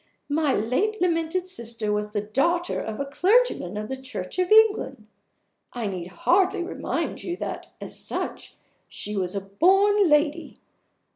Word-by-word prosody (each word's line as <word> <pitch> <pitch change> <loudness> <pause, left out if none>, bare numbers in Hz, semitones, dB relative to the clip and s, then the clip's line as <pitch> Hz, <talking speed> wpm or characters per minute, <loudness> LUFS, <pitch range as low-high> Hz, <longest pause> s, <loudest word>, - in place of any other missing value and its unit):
My 290 -1 +2
late 355 - 0
lamented 345 0 0
sister 230 - -4
was 210 0 -1
the 210 -1 -2
daughter 335 +12 0
of 220 -1 -5
a 280 - -1
clergyman 355 - +2
of 210 0 -4
the 265 - -3
Church 255 - -6
of 365 +1 0
England. 440 -1 +4 0.7
I 240 -2 -3
need 185 -4 -4
hardly 355 - +2
remind 350 - -3
you 350 0 -4
that, - - -5
as - - -3
such, - - -3 0.3
she 210 - -5
was 185 -1 -2
a 200 - -1
born 385 - +3
lady. 295 +2 +1
295 Hz, 150 wpm, -25 LUFS, -, 0.7 s, England